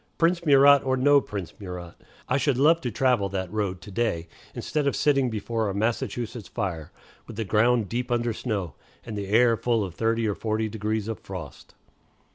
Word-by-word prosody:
Prince 170 +1 +2
Murat, 140 0 +7
or 130 -1 +1
no 140 +2 +5
Prince 100 -8 -6
Murat, 90 -3 -7 0.3
I - - +1
should 140 -2 +1
love 160 +5 +4
to 125 - -2
travel 120 -4 +1
that 95 -1 -4
road 100 -4 -2
to 105 - -11
day, 95 -7 -1 0.3
instead 150 -2 -1
of 140 - +1
sitting 135 -3 +2
before 110 0 -2
a 100 - -4
Massachusetts 115 +1 -2
fire, 85 -8 -4 0.4
with 115 - -9
the 110 +1 -3
ground 115 +2 +2
deep 125 +4 -3
under 120 -1 0
snow, 100 - -3 0.3
and 110 - -6
the 100 -1 -4
air 115 +3 +4
full 115 -1 0
of 95 -4 -5
thirty 115 +3 0
or 105 - 0
forty 110 +1 -2
degrees 110 0 -2
of 115 -2 -4
frost. 90 -7 -9
110 Hz, 190 wpm, -26 LUFS, 100-125 Hz, 0.4 s, Murat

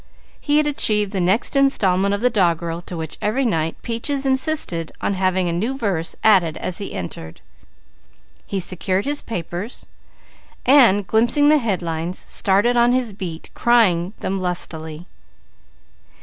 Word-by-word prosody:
He 295 0 +1
had 305 - +3
achieved 210 -8 +2
the 190 - -2
next 190 +10 0
installment 200 -9 +2
of 200 - -6
the 250 +1 +2
doggerel 170 -4 0
to 175 - -6
which 160 -1 -6
every 240 +6 0
night 165 -7 -1
Peaches 270 +4 -2
insisted 265 - 0
on - - -1
having 185 -1 0
a 170 - -1
new 225 +10 -2
verse 190 -9 -2
added 180 -7 +3
as 180 - -4
he 200 - -6
entered. 85 -3 -7 1.1
He 195 - -2
secured 185 +1 -2
his 290 +1 0
papers, 180 +2 -6 0.8
and 235 -8 +5
glimpsing 235 +9 +3
the 305 0 +5
headlines 175 - -3
started 205 +5 +1
on 240 +1 +4
his 250 -4 -1
beat 180 -5 -7
crying 200 -7 +2
them 195 0 -2
lustily. 160 -2 -4
195 Hz, 145 wpm, -20 LUFS, 175-240 Hz, 1.1 s, and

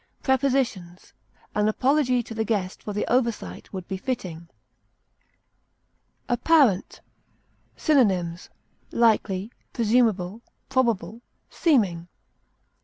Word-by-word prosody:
Prepositions: 260 -10 0 0.4
An 210 0 +1
apology 255 +2 +2
to 230 - -9
the 220 0 -1
guest 200 -4 -2
for 210 - -6
the 205 - -2
oversight 235 -3 -1
would 185 -3 -7
be 190 - -3
fitting. 185 -8 -5 1.8
APPARENT. 245 - +2 0.8
Synonyms: 185 - +1 0.4
likely, 215 -3 +1 0.2
presumable, 220 -4 +1 0.3
probable, 235 -3 0 0.3
seeming. 195 - +1
225 Hz, 85 wpm, -25 LUFS, 185-255 Hz, 1.8 s, apology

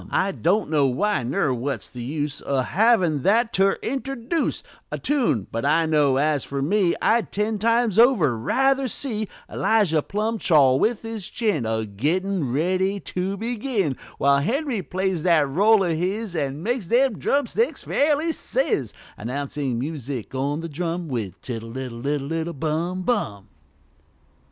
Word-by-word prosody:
I 195 - +1
don't 185 +1 0
know 145 -3 +3
why, 205 +8 0
ner 130 +2 0
what's 125 -2 -3
the 125 - -9
use 145 +3 -3
O' 135 -2 +1
havin' 180 - +2
that 225 - +2
to 195 +1 +3
interduce 270 +3 -2 0.3
A - - -2
tune 250 - 0
but 115 - -3
I 160 +4 +3
know, 150 -4 +3
as 150 0 +1
fer 140 - -4
me 180 +2 +2
I'd 220 - +2
ten 210 +1 -1
times 230 -1 +2
over 215 - +5
ruther 270 - +1
see 220 -3 -3 0.2
Elijah 200 -9 +2
Plumb 215 +6 -2
chaw 140 -8 +5
with 225 - 0
his 225 -4 -5
chin, 205 - -1
A 110 0 -1
gettin' 155 - -1
ready 185 +7 0
to 190 +1 -3
begin, 225 - -1 0.2
While 140 0 +4
Henry 255 - -1
plays 185 -2 -2
that 160 -4 +3
roll 200 +8 +4
o' 170 -3 0
his 190 +3 -2
An' 145 0 -2
makes 235 -3 -1
them 245 +2 +2
drumsticks 285 - 0
fairly 300 +3 +1
sizz, - - -1 0.3
Announcin' 140 0 -3
music, 135 -3 -5
on 140 +4 -2
th' 165 - -6
drum, 170 +1 -3
With 105 -8 -4
"Tiddle 115 0 -6
iddle 125 -3 -6
iddle 145 0 -1
iddle 165 +1 -2
Bum 170 +5 -1
Bum!" 110 - -2
175 Hz, 155 wpm, -23 LUFS, 140-220 Hz, 0.3 s, over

